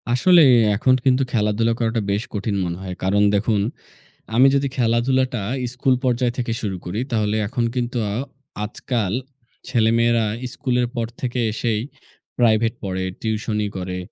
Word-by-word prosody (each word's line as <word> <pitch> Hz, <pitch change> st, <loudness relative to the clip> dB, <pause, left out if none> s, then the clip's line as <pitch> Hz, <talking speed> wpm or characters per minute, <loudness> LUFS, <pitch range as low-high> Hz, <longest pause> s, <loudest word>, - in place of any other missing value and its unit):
আসলে 170 Hz, +9 st, +5 dB, 0.3 s
এখন 130 Hz, +5 st, +3 dB
কিন্তু 130 Hz, 0 st, +4 dB
খেলাধুলা 110 Hz, +1 st, +1 dB
করাটা 115 Hz, -1 st, 0 dB
বেশ 100 Hz, +2 st, 0 dB
কঠিন 100 Hz, 0 st, -2 dB
মনে 85 Hz, 0 st, -3 dB
হয়। 95 Hz, -1 st, -5 dB
কারণ 100 Hz, +2 st, +3 dB
দেখুন, 105 Hz, 0 st, +1 dB, 0.7 s
আমি 130 Hz, +3 st, +7 dB
যদি 140 Hz, 0 st, +1 dB
খেলাধুলাটা 125 Hz, 0 st, +1 dB, 0.3 s
স্কুল 130 Hz, +1 st, +2 dB
পর্যায় 125 Hz, -1 st, +1 dB
থেকে 120 Hz, -2 st, -2 dB
শুরু 100 Hz, -4 st, -3 dB
করি, 90 Hz, +5 st, -3 dB
তাহলে 105 Hz, -2 st, +1 dB
এখন 120 Hz, +2 st, -2 dB
কিন্তু 125 Hz, 0 st, -2 dB, 0.7 s
আজকাল 110 Hz, -3 st, -2 dB, 0.6 s
ছেলেমেয়েরা 115 Hz, -1 st, +3 dB, 0.3 s
স্কুলের 125 Hz, -1 st, 0 dB
পর 115 Hz, -1 st, -1 dB
থেকে 125 Hz, -1 st, -2 dB
এসেই 110 Hz, 0 st, -1 dB, 0.6 s
private 115 Hz, -1 st, +3 dB
পড়ে, 95 Hz, -1 st, -2 dB, 0.2 s
টিউশনি 110 Hz, -1 st, -1 dB
করে। 90 Hz, 0 st, -4 dB
115 Hz, 135 wpm, -21 LUFS, 105-125 Hz, 0.7 s, আমি